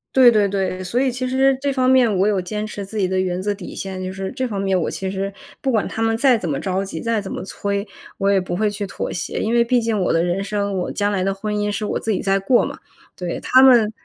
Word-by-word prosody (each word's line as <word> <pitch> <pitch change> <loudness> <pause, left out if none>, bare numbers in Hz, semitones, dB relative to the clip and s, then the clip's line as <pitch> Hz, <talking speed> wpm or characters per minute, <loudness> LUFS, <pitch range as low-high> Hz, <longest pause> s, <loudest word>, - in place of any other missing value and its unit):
对 255 -2 +8
对 210 -2 +3
对。 190 -1 -2
所 230 +8 -1
以 265 -2 +2
其 255 +1 -3
实 265 +1 +3
这 280 0 -1
方 255 -1 +2
面 245 -6 +4
我 195 - +4
有 205 -3 +1
坚 210 +4 -4
持 205 -2 -6
自 215 +2 -8
己 195 - +2
的 185 0 0
原 185 -1 -1
则 205 +1 0
底 195 -3 -9
线， 190 -1 -5
就 185 0 -4
是 190 0 -4
这 255 -1 -2
方 200 -4 -4
面， 190 -2 +1
我 - - -1
其 190 0 -4
实 195 +1 -3 0.3
不 270 - -2
管 220 -3 +1
他 225 - -4
们 225 0 +2
再 250 0 +4
怎 175 -6 -4
么 140 - -1
着 190 0 -2
急， 160 -4 -6
再 230 -2 0
怎 195 - -6
么 - - -5
催， 200 +1 -3 0.3
我 200 0 +2
也 195 - +4
不 180 -1 -3
会 210 +2 +1
去 205 -1 -4
妥 - - -4
协， 175 -1 -4
因 225 +2 0
为 235 - +4
毕 240 0 +2
竟 225 -2 0
我 185 - +1
的 165 +1 +2
人 180 +2 0
生， 200 -1 -2
我 180 - -2
将 205 0 0
来 190 -2 0
的 195 +1 0
婚 210 +1 -4
姻 205 0 0
是 205 +1 -3
我 - - -1
自 225 - -2
己 190 - -1
在 195 -1 +1
过 240 +6 +3
嘛。 - - -7 0.4
对， 175 -2 -4
他 260 +1 +5
们 240 -5 +6
205 Hz, 310 characters per minute, -21 LUFS, 190-225 Hz, 0.4 s, 对